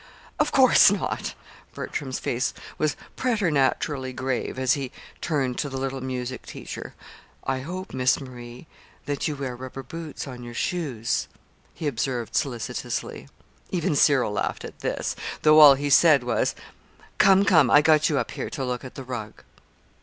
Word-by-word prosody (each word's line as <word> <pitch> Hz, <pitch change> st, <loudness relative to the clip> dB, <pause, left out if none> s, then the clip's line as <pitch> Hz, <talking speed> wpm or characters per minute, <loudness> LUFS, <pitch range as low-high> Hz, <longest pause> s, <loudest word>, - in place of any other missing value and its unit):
"Of -, -, +2 dB
course -, -, +7 dB
not!" -, -, -2 dB, 0.4 s
Bertram's 130 Hz, -2 st, -4 dB
face 125 Hz, +2 st, -2 dB, 0.2 s
was 155 Hz, -1 st, +1 dB, 0.2 s
preternaturally 150 Hz, -, 0 dB
grave 130 Hz, 0 st, -3 dB
as 130 Hz, -1 st, +2 dB
he 135 Hz, -3 st, -3 dB, 0.3 s
turned 135 Hz, -6 st, -1 dB
to 145 Hz, -, -1 dB
the 135 Hz, -, -5 dB
little 135 Hz, 0 st, -3 dB
music 130 Hz, -1 st, -4 dB
teacher. -, -, -8 dB, 0.5 s
"I 135 Hz, -1 st, -1 dB
hope, 185 Hz, +7 st, -6 dB
Miss 130 Hz, +1 st, +2 dB
Marie, 125 Hz, -1 st, -10 dB, 0.4 s
that 145 Hz, 0 st, -2 dB
you 150 Hz, -, -2 dB
wear 135 Hz, -3 st, -4 dB
rubber 130 Hz, +1 st, -8 dB
heels 165 Hz, -3 st, -6 dB
on 125 Hz, -3 st, -8 dB
your 120 Hz, -1 st, -9 dB
shoes," 135 Hz, -11 st, -1 dB, 0.5 s
he 160 Hz, -, -6 dB
observed 120 Hz, -4 st, -2 dB
solicitously. 120 Hz, -5 st, -3 dB, 0.4 s
Even 170 Hz, -4 st, 0 dB
Cyril 140 Hz, -6 st, +4 dB
laughed 105 Hz, -, -2 dB
at -, -, -10 dB
this, -, -, -2 dB, 0.3 s
though 155 Hz, 0 st, +7 dB
all 145 Hz, -3 st, +10 dB
he 145 Hz, +1 st, -2 dB
said 150 Hz, -4 st, +6 dB
was: 120 Hz, -, 0 dB, 0.6 s
"Come, 195 Hz, 0 st, +6 dB
come, 160 Hz, -10 st, +5 dB
I 145 Hz, -, +6 dB
got 155 Hz, +1 st, +4 dB
you 150 Hz, -, +1 dB
up -, -, -1 dB
here -, -, -5 dB
to 135 Hz, -, -4 dB
look 125 Hz, 0 st, -3 dB
at 130 Hz, -, -10 dB
the 135 Hz, -, -7 dB
rug." 120 Hz, -4 st, -7 dB
135 Hz, 160 wpm, -25 LUFS, 125-150 Hz, 0.6 s, all